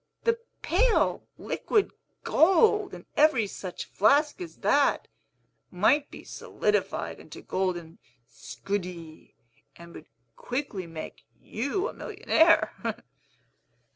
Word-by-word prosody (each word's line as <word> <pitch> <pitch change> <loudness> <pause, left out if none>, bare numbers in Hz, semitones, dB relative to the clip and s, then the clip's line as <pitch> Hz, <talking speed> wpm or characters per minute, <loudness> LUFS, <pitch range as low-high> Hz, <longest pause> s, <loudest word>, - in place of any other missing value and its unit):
The 460 0 +2 0.2
pale, 445 +6 +2
liquid 420 -3 0 0.3
gold, 395 +4 +3
in - - -12
every 285 -8 +4
such 190 -2 -7
flask 290 - +2
as 345 - -8
that, 285 -1 +2 0.6
might 275 +11 +2
be - - -11
solidified - - -2
into - - -12
golden 175 -3 -3 0.3
scudi, 170 - -6 0.4
and 170 0 -13
would 155 - -12 0.3
quickly 245 -8 -4
make 165 -1 -9
you 280 - -2
a - - -7
millionaire!" 385 -7 +2
275 Hz, 100 wpm, -27 LUFS, -, 0.6 s, every